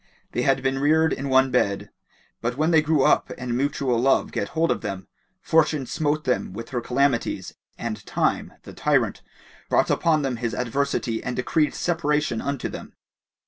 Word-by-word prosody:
They - - -1
had 135 -1 +2
been 135 0 0
reared 160 +2 +3
in 140 +1 -4
one 130 0 +4
bed; 100 -5 0 0.5
but 120 +2 -2
when 155 +3 +2
they 160 -2 +6
grew 150 -2 +2
up - - +3
and 125 -1 -3
mutual 135 -2 0
love 135 +2 +2
get - - -2
hold 165 +1 +3
of - - -1
them, 95 -3 -5 0.4
Fortune 155 -3 +2
smote 155 +2 -1
them 125 -7 -1
with 115 +3 -7
her 125 -2 -2
calamities 125 0 0 0.2
and 115 -2 -5
Time, - - 0
the - - -11
tyrant, - - +1 0.5
brought - - +3
upon 155 -3 +2
them 130 -3 -1
his 115 -1 -3
adversity 125 -2 -1
and 125 - -3
decreed 150 +4 +1
separation 150 -7 0
unto 140 -2 -2
them. - - -9
135 Hz, 175 wpm, -24 LUFS, 120-150 Hz, 0.5 s, they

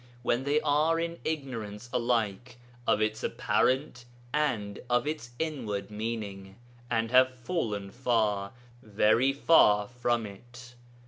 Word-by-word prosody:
] 120 - -25
when 120 +2 0
they 145 +2 +3
are 155 +2 +2
in 170 0 -3
ignorance 120 -8 -4
alike 120 0 -1 0.3
of 110 - +3
its 110 0 -2
apparent 130 -1 0 0.3
and 110 -10 -1
of 120 0 +2
its 150 -6 -4
inward 120 -11 -3
meaning, 105 -3 -5 0.3
and 115 -1 0
have 130 0 +6
fallen 115 - -3
far, 110 -5 0 0.3
very 110 +4 +3
far 105 -8 +5
from 120 -1 -1
it! 120 +5 -12
120 Hz, 125 wpm, -29 LUFS, 105-130 Hz, 0.3 s, have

